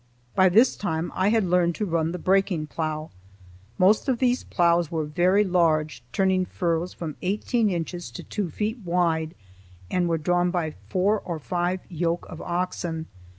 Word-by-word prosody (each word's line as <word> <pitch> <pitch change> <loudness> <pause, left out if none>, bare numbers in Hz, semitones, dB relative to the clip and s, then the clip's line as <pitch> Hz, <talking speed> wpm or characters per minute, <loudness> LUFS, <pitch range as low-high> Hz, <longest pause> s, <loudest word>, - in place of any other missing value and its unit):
By 185 0 +5
this 225 +8 +5
time 165 -4 -2
I 190 +2 +2
had 220 -1 +3
learned 175 -2 +2
to 210 - -2
run 165 -3 0
the 180 - -4
breaking 185 -3 +1
plough. 155 0 -4 0.7
Most 205 +8 +4
of 255 - +2
these 250 0 +1
ploughs 170 -2 +2
were 160 -2 -2
very 180 +7 +3
large, 155 - +1
turning 190 +1 +2
furrows 175 -1 -1
from 160 -3 -6
eighteen 210 +4 +1
inches 175 -3 -4
to - - -7
two 205 -5 -3
feet 215 - -3
wide, 170 -2 0 0.6
and 180 -1 +1
were 165 - +1
drawn 175 +3 +1
by 170 -4 -1 0.2
four 205 +3 +2
or 170 -4 -5
five 175 +3 -2
yoke 170 0 -2
of - - -8
oxen. 175 -2 -3
175 Hz, 165 wpm, -25 LUFS, 165-190 Hz, 0.7 s, By